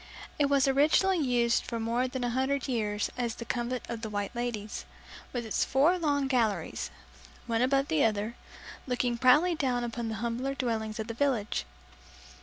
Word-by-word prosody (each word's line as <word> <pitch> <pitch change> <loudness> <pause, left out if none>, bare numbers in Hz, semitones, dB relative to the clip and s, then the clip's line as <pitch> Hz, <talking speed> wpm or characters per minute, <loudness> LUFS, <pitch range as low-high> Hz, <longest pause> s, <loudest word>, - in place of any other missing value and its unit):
It 285 - +4
was 275 -1 +3
originally 310 +7 +4
used 240 -4 +2
for 230 - -4
more 235 +3 0
than 255 0 -4
a 240 - 0
hundred 265 +2 0
years 210 -5 -1
as 235 -2 -1
the 235 - -7
convent 240 +1 -2
of 230 -1 -5
the 220 - -4
"White 205 +1 -3
Ladies", 230 -3 -3 0.5
with 240 -2 -3
its 220 - +1
four 305 +7 +3
long 285 -4 +1
galleries, 210 - 0 0.6
one 230 0 0
above 275 +2 +2
the 155 - +2
other, 215 +1 0 0.5
looking 245 -1 0
proudly 295 +8 +5
down 255 -6 0
upon 235 -1 -3
the 220 - -3
humbler 240 +5 -2
dwellings 225 -4 -2
of 220 - -2
the 230 - -5
village. 235 - 0
240 Hz, 175 wpm, -29 LUFS, 225-270 Hz, 0.6 s, proudly